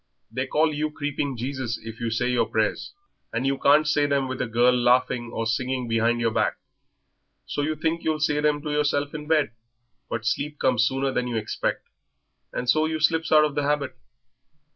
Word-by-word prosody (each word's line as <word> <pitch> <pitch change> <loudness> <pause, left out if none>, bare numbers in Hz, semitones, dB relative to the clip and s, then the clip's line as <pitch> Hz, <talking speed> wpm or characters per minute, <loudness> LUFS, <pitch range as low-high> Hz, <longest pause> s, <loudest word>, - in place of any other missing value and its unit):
They 130 +3 -2
call 155 +3 +2
you 150 +1 -1
Creeping 145 -3 -3
Jesus 130 -1 -3
if 115 0 -8
you 115 - -1
say 125 +2 0
your 120 -2 +2
prayers, 110 +10 -1 0.4
and 115 +3 -2
you 135 0 0
can't 150 +2 +5
say 150 -1 +2
them 140 -2 +1
with 130 0 -4
a - - -1
girl 120 +2 +4
laughing 125 -1 +2
or 115 - -3
singing 125 +2 -1
behind 115 +1 +1
your 115 -1 +1
back, - - 0 0.9
so - - -3
you 155 +2 -1
think 160 +2 -1
you'll 155 -1 0
say 150 -1 +1
them 150 -1 +1
to 150 - -3
yourself 145 -1 0
in 150 -1 -6
bed, 155 -7 +2 0.6
but 110 -1 -3
sleep 145 +6 -1
comes 125 -4 +2
sooner 135 +1 -1
than 125 -1 -1
you 120 - -3
expect, 110 -1 -2 0.7
and 125 - -4
so 155 +5 +3
you 160 0 -2
slips 160 +1 +1
out 155 -1 +7
of 150 - -2
the 145 - 0
habit. 145 -2 -1
135 Hz, 200 wpm, -25 LUFS, 120-150 Hz, 0.9 s, out